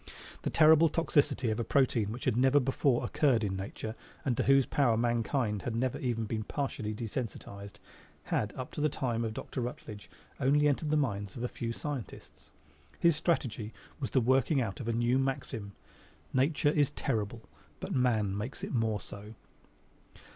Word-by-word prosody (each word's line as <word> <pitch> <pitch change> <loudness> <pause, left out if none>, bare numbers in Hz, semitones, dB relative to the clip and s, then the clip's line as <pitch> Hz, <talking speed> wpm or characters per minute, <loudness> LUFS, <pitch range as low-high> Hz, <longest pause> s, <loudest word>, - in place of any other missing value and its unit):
The - - -1
terrible 160 +1 +6
toxicity 145 -7 +1
of 110 - -2
a - - +1
protein 115 -5 +2
which 120 +3 -6
had 125 - +2
never 130 +3 +5
before 130 -1 +1
occurred 120 -3 +2
in 95 -2 -1
nature 100 +3 -5 0.3
and 130 -3 +1
to - - +1
whose 135 -1 +5
power 120 -6 +2
mankind 120 -2 0
had 120 - -3
never 125 +2 -1
been 130 - -2
even 115 -2 -2
partially 125 -7 -3
desensitized 105 -3 -6 0.5
had 105 - -1
up 130 -1 -6
to - - -4
the 155 - +3
time 120 -4 -1
of 110 -1 -3
Dr. 130 - -4
Rutledge 110 -4 -7 0.3
only 145 +3 +4
entered 150 +2 0
the 155 - +3
minds 105 -9 -1
of 120 - -5
a - - +1
few 115 -1 -4
scientists. 140 0 -7 0.5
His 170 -2 +4
strategy 125 -9 -1 0.3
was 135 - -3
the 130 - +2
working 130 +4 +3
out 110 -6 -2
of 120 - -5
a - - +1
new 120 +3 +2
maxim: 130 -6 -3 0.6
Nature 145 +3 +2
is 145 -2 +3
terrible, 115 -5 -3 0.4
but - - -4
man 110 -6 +2
makes 110 +7 -5
it - - -4
more 110 -3 +1
so. 105 +3 -10
120 Hz, 175 wpm, -31 LUFS, 110-135 Hz, 0.6 s, terrible